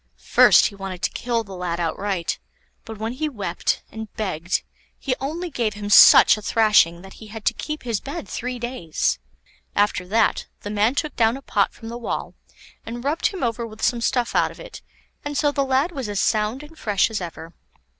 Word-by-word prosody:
First - - +6
he - - -1
wanted 195 -2 -7
to - - +1
kill 235 -1 -1
the 195 -2 -11
lad 175 -1 -3
outright, 175 +1 -2 0.5
but 225 -1 -8
when 220 +3 -3
he 305 +4 -2
wept, 195 -9 -2
and 220 -1 -7
begged, 185 -4 -2 0.3
he 270 - -1
only 330 +6 -4
gave 225 -5 -1
him 205 0 -5
such - - +9
a - - -8
thrashing 205 -6 +3
that 195 - -12
he 220 - -10
had 215 0 -9
to - - +3
keep 305 0 -5
his 230 -5 -1
bed 305 +4 -7
three 250 +1 -4
days. 240 - -2 0.6
After 205 -3 +1
that 220 +4 +1
the 205 - -5
man 210 +5 +2
took 305 0 -2
down 230 +2 +2
a - - -11
pot 200 -5 +1
from 225 - -10
the 235 +1 -6
wall, 235 - -4 0.5
and 240 +1 -7
rubbed 295 +4 +1
him 385 -7 -5
over 235 0 -1
with 220 0 -11
some 240 -1 +1
stuff 245 0 0
out - - +3
of - - -13
it, - - -10 0.4
and 290 -1 -4
so 295 -1 +2
the 280 -1 0
lad 270 +5 +1
was 265 -9 -5
as 205 -1 -2
sound 215 +6 0
and 315 +2 -14
fresh 205 0 +1
as 215 - -2
ever. 165 -1 -8
225 Hz, 205 wpm, -23 LUFS, 200-260 Hz, 0.6 s, such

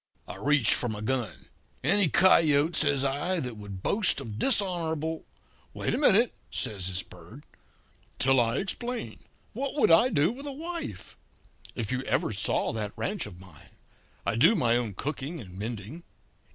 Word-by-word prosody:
"I - - -8
reached 145 -6 +3
for 120 - 0
my 105 -1 -5
gun. 120 0 -3 0.4
"'Any 190 +4 +3
coyote,' 160 -2 +4
says 145 -3 +2
I, 150 +7 0
'that 125 -6 -5
would 100 -3 -9
boast 205 -8 +3
of 110 -5 -7
dishonourable 165 - -1 0.2
' - - -33
"'Wait - - -2
a - - 0
minute,' 235 -4 +5 0.2
says 95 -4 -2
this 95 0 -1
Bird, 90 - -14 0.7
'till 135 0 +3
I 115 +2 +1
explain. 235 +4 -4 0.3
What 270 +5 -3
would 290 - +3
I 165 +10 +6
do 155 - +2
with 275 +4 -8
a - - -3
wife? 330 +4 -6 0.6
If 115 -2 -3
you 130 0 -1
ever 110 - 0
saw 105 +3 0
that 105 -2 -4
ranch 200 - -2
of 90 -4 -12
mine! 90 -6 -16 0.6
I 100 - 0
do 160 - +5
my 120 - +2
own 115 -5 -2
cooking 150 - -4
and 95 -7 -11
mending. 115 - -6
140 Hz, 165 wpm, -28 LUFS, -, 0.7 s, I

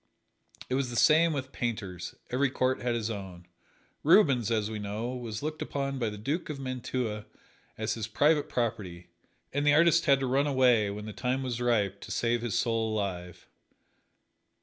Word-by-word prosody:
It - - -3
was 130 -1 0
the 120 - -6
same 160 +6 +5
with 130 -3 -4
painters 100 -7 -4 0.2
every 135 +2 +2
court 130 0 0
had 120 -1 0
its 115 -1 -2
own. 95 -4 -7 0.6
Rubens, 145 - +4
as 110 -2 +1
we 110 -1 -5
know, 105 +3 -4
was 115 -3 -5
looked 155 0 -4
upon 140 -1 -3
by 115 -3 0
the 105 - -7
Duke 145 - -3
of 150 -2 -5
Mantua 125 -4 -3 0.5
as 110 0 -1
his 110 -1 -4
private 150 +7 +2
property, 105 -8 -3 0.4
and 145 +1 0
the 145 0 +5
artist 170 +1 +4
had 140 -1 +5
to - - 0
run 135 +3 +2
away, 125 -6 +3
when 105 +1 -6
the 110 - -7
time 130 +3 -1
was 125 -2 -3
ripe, 105 -5 +1
to - - -10
save 120 0 0
his 120 -3 -1
soul 115 -2 0
alive. 90 -4 -4
120 Hz, 180 wpm, -29 LUFS, 105-135 Hz, 0.6 s, same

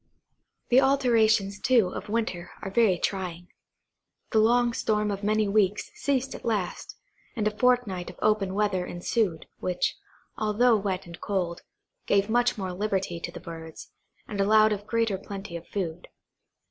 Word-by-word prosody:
The 250 +2 +6
alternations, 225 -7 +3
too, 250 -8 +3
of 205 - -7
winter, 215 -6 -2
are 195 - -4
very 205 -4 +4
trying. 180 -2 -3 0.8
The 220 - +4
long 240 +2 +3
storm 210 -2 0
of 200 0 -4
many 215 0 +2
weeks 200 -1 +1
ceased 270 -2 -1
at - - -9
last, 210 -6 -2 0.4
and 215 -3 0
a 210 - -2
fortnight 235 -7 +1
of - - -12
open 205 -3 +1
weather 205 -3 +1
ensued, 175 -1 -1
which, 180 -1 -1 0.4
although 220 +3 +3
wet 195 -2 -2
and 170 -1 -11
cold, 180 -4 -2 0.5
gave 200 +2 +2
much 245 0 +2
more 190 -3 -3
liberty 190 -3 -2
to - - -5
the - - -8
birds, 160 -1 -9 0.4
and 205 -5 -2
allowed 215 +2 +5
of 205 0 -6
greater 225 -4 0
plenty 195 -2 -7
of 170 0 -7
food. 175 -3 -4
205 Hz, 155 wpm, -27 LUFS, 185-225 Hz, 0.8 s, The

